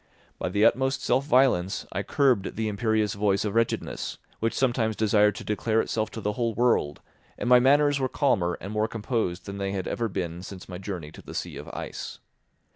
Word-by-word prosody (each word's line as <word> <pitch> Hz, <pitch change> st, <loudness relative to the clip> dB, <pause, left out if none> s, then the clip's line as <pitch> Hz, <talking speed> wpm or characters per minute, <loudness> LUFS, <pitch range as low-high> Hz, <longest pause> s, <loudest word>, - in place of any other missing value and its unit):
By -, -, -1 dB
the 100 Hz, +3 st, +3 dB
utmost 135 Hz, +1 st, +2 dB
self 135 Hz, -, +2 dB
violence 125 Hz, -10 st, +2 dB
I -, -, -2 dB
curbed 130 Hz, -8 st, +1 dB
the 110 Hz, 0 st, -1 dB
imperious 110 Hz, 0 st, 0 dB
voice 100 Hz, 0 st, +1 dB
of 105 Hz, -, -2 dB
wretchedness, 115 Hz, 0 st, -1 dB, 0.2 s
which 115 Hz, 0 st, 0 dB
sometimes 120 Hz, -4 st, +1 dB
desired 105 Hz, -1 st, +3 dB
to -, -, -7 dB
declare 110 Hz, +1 st, 0 dB
itself 110 Hz, -1 st, -1 dB
to 110 Hz, -, -5 dB
the 105 Hz, 0 st, -1 dB
whole 115 Hz, -2 st, -1 dB
world, 120 Hz, -12 st, +1 dB, 0.4 s
and -, -, -3 dB
my 125 Hz, 0 st, +7 dB
manners 145 Hz, +2 st, +4 dB
were 130 Hz, -1 st, 0 dB
calmer 95 Hz, -13 st, +1 dB
and 100 Hz, +3 st, -6 dB
more 110 Hz, 0 st, +1 dB
composed 105 Hz, -5 st, -2 dB
than 100 Hz, 0 st, -6 dB
they 100 Hz, 0 st, -2 dB
had 95 Hz, -2 st, -3 dB
ever 115 Hz, -1 st, -1 dB
been 90 Hz, -3 st, -4 dB
since 95 Hz, 0 st, -9 dB
my 90 Hz, -1 st, -7 dB
journey 90 Hz, -6 st, -6 dB
to -, -, -12 dB
the -, -, -10 dB
sea -, -, -4 dB
of -, -, -8 dB
ice. -, -, -6 dB
110 Hz, 200 wpm, -26 LUFS, 95-120 Hz, 0.4 s, my